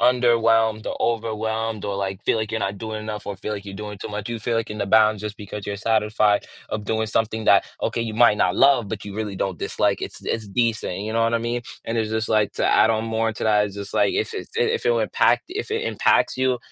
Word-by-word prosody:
underwhelmed 115 -3 +3
or - - -3
overwhelmed 110 -1 -1
or, 100 -1 -2
like, 95 0 -3
feel - - +1
like 110 -1 -3
you're 110 - -1
not 100 0 -2
doing 110 0 -5
enough 110 -1 -6
or 100 - -3
feel 100 +3 -5
like 105 -1 -5
you're 100 - -8
doing 105 0 -7
too - - -6
much. 105 0 -5
You 120 -1 -3
feel 115 +2 -1
like 115 -1 -2
in 105 - -5
the 100 - -1
bounds 110 0 +4
just 105 0 -5
because 105 -1 -7
you're 100 - -2
satisfied 105 -1 +2 0.2
of 105 -1 -4
doing 110 +1 -1
something 110 0 -1
that, 100 - +6 0.2
okay, - - -1
you 115 -2 -3
might 115 -2 +5
not 90 - +2
love, 135 -5 +4
but 105 -1 -5
you 100 0 -7
really 105 -2 -3
don't 95 -2 -2
dislike. - - 0
It's - - -7
it's 110 -2 -2
decent, 110 -3 -1
you 110 +2 -4
know 115 0 +2
what 115 - +1
I 115 - +3
mean? 120 +1 -2 0.2
And 115 0 -2
it's 110 -1 -1
just 110 0 -1
like 110 -2 +2
to - - -2
add 110 - +5
on 110 0 0
more 115 0 0
to - - -8
that, 105 -1 +3
it's 100 - -9
just 100 0 -7
like - - +2
if 425 +3 -1
it's 405 - -6
d 455 +1 -3
if 460 -1 0
it - - +5
will 485 - +2
impact - - +2
if 420 +4 -4
it 445 0 -1
impacts - - +2
you 130 -1 +1
110 Hz, 265 wpm, -23 LUFS, 105-115 Hz, 0.2 s, that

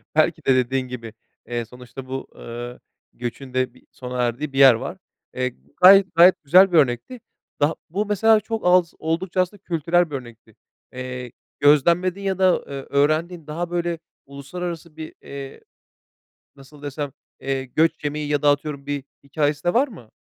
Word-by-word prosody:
Belki 160 0 +2
de 130 - +4
dediğin 130 +1 0
gibi, 115 -3 -8 0.3
eee, 120 -1 -3
sonuçta 125 +2 -11
bu, 135 0 -5
ııı, 120 +1 -8 0.3
göçün 125 +2 -7
de 130 -1 0
bir - - -21
sona 125 -1 -5
erdiği 135 +4 -2
bir 135 - -1
yer 135 -3 +9
var. 115 - -5 0.4
Eee, 125 -1 -2 0.3
gayet 190 -1 +7
gayet 175 0 +6
güzel 185 +6 +6
bir 170 - +4
örnekti. 140 - +1 0.4
Daha 150 +3 +2
Bu 200 +5 -1
mesela 215 +2 +4
çok 225 -3 -5
az, 180 -1 +4
oldukça 170 +3 -1
aslında 190 +2 -4
kültürel 170 0 +1
bir - - -3
örnekti. 120 -4 -10 0.4
Eee, 125 -1 -6 0.3
gözlemlediğin 170 +7 +3
ya 190 -1 -1
da, 185 -1 +5
ııı, 140 -1 -5
öğrendiğin, 155 +3 0
daha 170 +3 -4
böyle 170 -1 -1 0.3
uluslararası 160 +3 -7
bir, 155 - -7
eee, 140 -1 -9 1.0
nasıl 140 +2 -16
desem, 145 -1 -4 0.3
eee, 135 0 -2
göç 155 +4 0
yemeği 150 0 -2
ya 145 -1 0
da 145 - +5
atıyorum 145 -1 -2
bir 145 -2 -3 0.2
hikâyesi 145 +1 -1
de 175 - +1
var 270 +4 +3
mı? 125 - -14
145 Hz, 165 wpm, -22 LUFS, 130-175 Hz, 1.0 s, yer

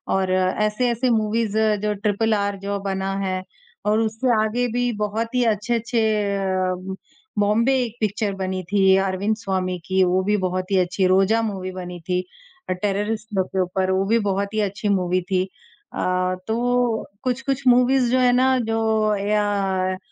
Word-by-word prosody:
और 190 -1 0
ऐसे-ऐसे 215 +6 +1
मूवीज़ 220 -1 0 0.3
जो 210 0 +1
ट्रिपल 210 +2 0
आर 200 -1 0
जो 200 +1 -3
बना 195 -1 -2
है 185 -1 -2 0.4
और 210 +1 +3
उससे 225 +3 0
आगे 240 +3 0
भी 245 0 +1
बहुत 225 +3 -2
ही 250 - +3
अच्छे-अच्छे 230 +2 0 0.4
अ, 185 -1 -2 0.4
बॉम्बे 215 +6 +3
एक 230 -2 -6
पिक्चर 210 -1 -1
बनी 190 -1 -3
थी, 190 +1 +3
अरविंद 195 +2 0
स्वामी 185 -3 -2
की 190 0 +2
वो 185 +1 +2
भी 210 +2 +1
बहुत 185 0 -2
ही 195 - +3
अच्छी, 185 +1 +1
रोज़ा 195 +4 +3
मूवी 195 -4 -3
बनी 180 -1 -7
थी, 180 0 +2 0.5
और 185 - 0
टेररिस्ट 210 +2 -1
लोग 190 -1 +1
के 190 - -1
ऊपर 185 +1 -1
वो 190 +1 +1
भी 230 +2 +3
बहुत 200 +1 -1
ही 215 - 0
अच्छी 205 +1 -2
मूवी 185 -2 +1
थी। 185 -1 +2
अ, 410 - -10 0.4
तो 240 0 0 0.2
कुछ-कुछ 265 +2 -1
मूवीज़ 250 0 +4
जो 255 - +3
है 250 -1 +4
ना 260 +1 +3
जो 220 -1 +1
या 200 -2 0
205 Hz, 165 wpm, -22 LUFS, 190-225 Hz, 0.5 s, मूवीज़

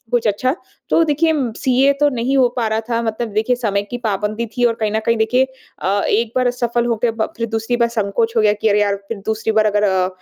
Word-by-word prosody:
कुछ 240 -2 +1
अच्छा। 255 +6 0 0.4
तो - - +4
देखिए 320 +1 +2 0.2
सीए 265 +2 +3
तो 295 - +5
नहीं 250 +3 0
हो 255 -2 +5
पा 235 - 0
रहा 220 +1 0
था 230 -1 0
मतलब 225 +1 -2
देखिए 220 +4 +1
समय 205 -5 -1
की 245 - -4
पाबंदी 215 0 -2
थी 245 - +1
और 235 -1 +3
कहीं 215 - +1
न 220 - 0
कहीं 230 - +3
देखिए 230 +4 +2 0.4
अ, 200 +2 +1
एक 225 +1 +1
बार 255 0 +2
असफ़ल 240 -1 0
हो 235 -1 0
के 240 - +3
ब 225 -1 -2
फ़िर 230 - -2
दूसरी 225 +2 -1
बार 235 -1 +2
संकोच 225 0 -1
हो 225 - +4
गया 210 -1 +4
कि 215 +1 0
अरे 210 0 +3
यार! 200 -1 +1
फ़िर 200 +2 -7
दूसरी 220 0 -1
बार 215 0 +3
अगर 210 0 +1
अ, 190 -2 +2
225 Hz, 255 wpm, -18 LUFS, 210-245 Hz, 0.4 s, तो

